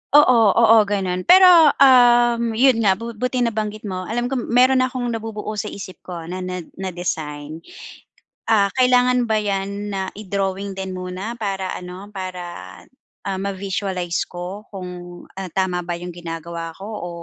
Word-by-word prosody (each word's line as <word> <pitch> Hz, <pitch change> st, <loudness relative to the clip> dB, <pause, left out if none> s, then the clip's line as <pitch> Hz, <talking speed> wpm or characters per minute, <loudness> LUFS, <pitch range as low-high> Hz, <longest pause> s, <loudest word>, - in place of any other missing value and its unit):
Oo, 255 Hz, -5 st, +7 dB, 0.2 s
oo 230 Hz, -1 st, +6 dB
ganun. 185 Hz, -3 st, -2 dB
Pero, 360 Hz, -4 st, +8 dB, 0.2 s
um, 240 Hz, -3 st, +5 dB
yun 250 Hz, -1 st, +4 dB
nga 195 Hz, -4 st, +3 dB
bu 230 Hz, +4 st, -7 dB
buti 250 Hz, +2 st, -1 dB
nabanggit 215 Hz, -2 st, -3 dB
mo 185 Hz, -3 st, -5 dB
alam 240 Hz, +3 st, -2 dB
ko 265 Hz, -, 0 dB
meron 255 Hz, +2 st, +3 dB
na 255 Hz, -, +3 dB
akong 250 Hz, -1 st, -5 dB
nabubuo 220 Hz, -2 st, -5 dB
sa 210 Hz, -, -3 dB
isip 190 Hz, -2 st, -8 dB
ko 175 Hz, -2 st, -8 dB
na 180 Hz, +3 st, -6 dB
na 180 Hz, -1 st, -5 dB, 0.2 s
na 185 Hz, -2 st, -4 dB
design. 155 Hz, -3 st, -4 dB, 0.9 s
Ah, 205 Hz, -3 st, +3 dB
kailangan 250 Hz, -1 st, +4 dB
ba 220 Hz, -, 0 dB
'yan 200 Hz, +1 st, -3 dB
na 190 Hz, -1 st, -4 dB
i-drawing 200 Hz, -1 st, -3 dB
din 190 Hz, -1 st, -4 dB
muna 185 Hz, +5 st, -5 dB
para 195 Hz, -5 st, -3 dB
ano 180 Hz, +2 st, -8 dB
para, 185 Hz, -2 st, -5 dB, 0.8 s
ah, 195 Hz, -1 st, -2 dB
ma-visualize 190 Hz, -2 st, -2 dB
ko 180 Hz, +4 st, -7 dB
kung, 180 Hz, -2 st, -9 dB
ah, 190 Hz, -1 st, -6 dB
tama 180 Hz, -1 st, -1 dB
ba 175 Hz, 0 st, -4 dB
'yong 175 Hz, 0 st, -8 dB
ginagawa 165 Hz, -1 st, -6 dB
ko 195 Hz, -, -8 dB
o 215 Hz, -5 st, -6 dB
195 Hz, 160 wpm, -21 LUFS, 180-230 Hz, 0.9 s, Pero